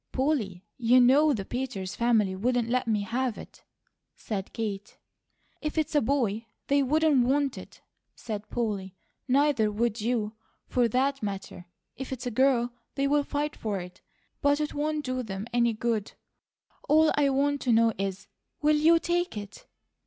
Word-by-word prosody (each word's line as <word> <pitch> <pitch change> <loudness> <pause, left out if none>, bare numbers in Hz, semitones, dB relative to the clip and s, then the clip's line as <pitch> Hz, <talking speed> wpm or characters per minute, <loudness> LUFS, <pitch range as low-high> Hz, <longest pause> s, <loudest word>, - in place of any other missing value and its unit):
"Polly, 230 - -1
you 245 +1 +5
KNOW 280 +5 +5
the 195 -3 -5
Peters 235 -7 -4
family 220 -5 +2
wouldn't 240 +3 0
let 250 0 0
me 215 -2 +1
have 240 +3 -2
it," - - -12 0.5
said 200 -3 -5
Kate. 205 -2 -5 0.6
"If 305 +1 -4
it's 310 0 0
a 295 - +4
boy, 230 -4 0 0.2
they 280 0 +4
wouldn't 295 -1 +3
WANT 275 +1 +1
it," - - -12 0.3
said 215 -2 -6
Polly. 200 -5 -3 0.3
"Neither 265 -5 +3
would 225 +1 -1
you, 220 -2 -1 0.3
for 245 -2 +2
that 270 +4 0
matter. 195 -3 -6 0.3
If 265 0 -6
it's 260 -1 -5
a 245 - -2
girl, 245 0 +2 0.2
they'll 280 +1 +2
fight 295 +1 -2
for 210 -3 -3
it; 180 0 -10 0.4
but 285 0 +3
it 300 -1 -2
won't 300 0 -2
do 255 0 -2
them 200 -3 -5
any 235 -1 +3
good. 220 -2 -2 0.8
All 315 +1 +5
I 290 -1 +3
want 280 +1 +1
to 250 - +1
know 230 0 +4
is, 195 0 -3 0.3
WILL 300 0 +3
YOU 325 +3 +5
TAKE 345 -4 -1
IT?" 205 -1 -9
245 Hz, 160 wpm, -27 LUFS, 215-285 Hz, 0.8 s, you